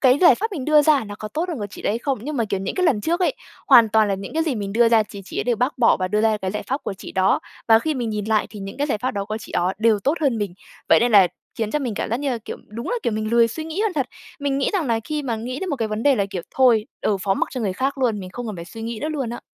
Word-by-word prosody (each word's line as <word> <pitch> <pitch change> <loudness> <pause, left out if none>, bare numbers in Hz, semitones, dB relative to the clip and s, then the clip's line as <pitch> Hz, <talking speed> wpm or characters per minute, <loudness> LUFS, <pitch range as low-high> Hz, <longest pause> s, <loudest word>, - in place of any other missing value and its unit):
cái 260 +1 +5
giải 350 - +8
pháp 440 +1 -3
mình 285 -8 -4
đưa 305 0 +5
ra 290 -5 +3
nó 205 - -7
có 215 - -6
tốt 330 +10 -3
hơn 325 - -3
của 205 - -3
chị - - -10
đấy 220 +3 0
không?" 270 -1 -2
Nhưng 295 +1 -4
mà, 230 - +1
kiểu, 195 -2 -2
những 195 - -3
cái 365 -2 +1
lần 250 -10 +2
trước 340 - 0
ấy, 360 - +2 0.3
hoàn 230 -2 +7
toàn 215 0 +3
là 200 - +1
những 195 +8 -7
cái 320 - +2
gì 305 -6 -1
mình 200 -2 -4
đưa 235 +1 +4
ra 225 -2 +5
chì 200 -1 -10
chị - - -6
ấy - - -1
đều 240 -2 +1
bác 250 +3 -1
bỏ 235 - +5
và 185 - -2
đưa 210 +2 +1
ra 220 -1 +3
cái 190 -2 -3
giải 210 - -4
pháp 270 +3 -2
của - - -3
chị - - -10
đó. 190 0 +2 0.3
Và 225 0 +7
khi 310 +5 -1
mình 240 -4 -2
nhìn 210 -1 -3
lại 215 -1 +1
thì 205 -2 -9
những 195 0 -7
cái 290 +1 0
giải 220 - -1
pháp 255 +3 -1
đó 200 -1 -3
của 215 +1 -4
chị 205 - -11
đó 180 +2 +1
đều 220 -2 +3
tốt 280 - +3
hơn 270 -7 +1
mình. 200 -4 -3 0.3
Vậy - - +6
nên 240 -1 +2
là 195 -3 +8 0.3
khiến 220 -2 -1
cho 300 - 0
mình 250 -6 -3
cảm - - -3
giác 235 - +1
như 285 -2 -1
là, 240 - -1
kiểu, - - -6
đúng 230 +3 -6
là, - - 0
kiểu, 230 - 0
mình 215 +1 -2
lười 235 -1 +5
suy 315 +7 -5
nghĩ 325 +5 -4
hơn 435 -3 +1
thật. 275 -5 -1 0.3
Mình 280 -1 0
nghĩ 275 - +1
rằng 355 -8 0
là 230 -1 +1
khi 300 -1 -3
mà 235 -4 -2
nghĩ 250 +4 -5
đến 380 - -3
một 285 - -1
cái 225 -3 -2
vấn 215 +1 -3
đề 285 -1 +5
là, 200 - +1
kiểu, 180 -4 -4
"Thôi, 240 -4 +4
ừ, 205 - +1
phó 195 -1 +1
mặc - - -1
cho 255 - -4
người 200 -4 -1
khác 270 +6 -2
luôn. 230 -5 +1
Mình 185 -1 -8
không 245 +4 -6
cần 210 -4 -5
phải 170 - -7
suy 225 +5 -9
nghĩ 230 -1 -4
nữa." 305 - -2
luôn 275 -7 -3
á. 240 - -6
230 Hz, 355 wpm, -22 LUFS, 210-280 Hz, 0.3 s, giải